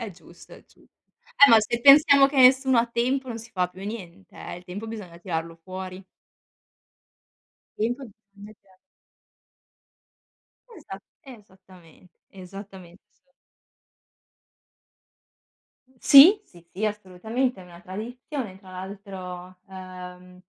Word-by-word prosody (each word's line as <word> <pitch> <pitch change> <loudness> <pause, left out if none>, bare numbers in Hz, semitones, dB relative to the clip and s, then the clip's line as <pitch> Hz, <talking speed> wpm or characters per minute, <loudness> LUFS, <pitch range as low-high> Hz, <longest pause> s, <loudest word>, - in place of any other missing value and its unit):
È 225 -3 -6
giusto, 175 0 -18
è - - -18
giu - - -26 0.6
eh, - - +3
ma 225 -1 +7
se 235 +2 -3
pensiamo 280 0 +7
che 280 - -7
nessuno 260 -1 +5
ha 230 - +2
tempo 250 +3 -2
non 230 -1 -6
si 230 +1 -13
fa 180 -5 -1
più 185 +2 -14
niente, 195 -3 -10
eh, - - -8
il 180 - -14
tempo 200 +5 -8
bisogna 205 -7 -9
tirarlo 165 -2 -5
fuori. 185 0 -8 1.8
Il 230 +3 -1
tempo 275 -1 -11 0.3
bisogna 205 +1 -14
tirar 190 -1 -27 2.0
Esa 195 -11 -10 0.3
esattamen 185 -6 -19 0.2
esattamente, 190 -1 -13
s 270 - -41 2.7
Sì, 350 +10 +8
sì, 175 -1 -20
sì, 200 +4 -6
assolutamente, 210 +3 -3
è - - -13
una 175 -1 -15
tradizione. 225 - -7
Tra 190 -1 -16
l'altro, 185 -1 -9
ehm, 180 -1 -12
195 Hz, 120 wpm, -24 LUFS, 180-235 Hz, 2.7 s, Sì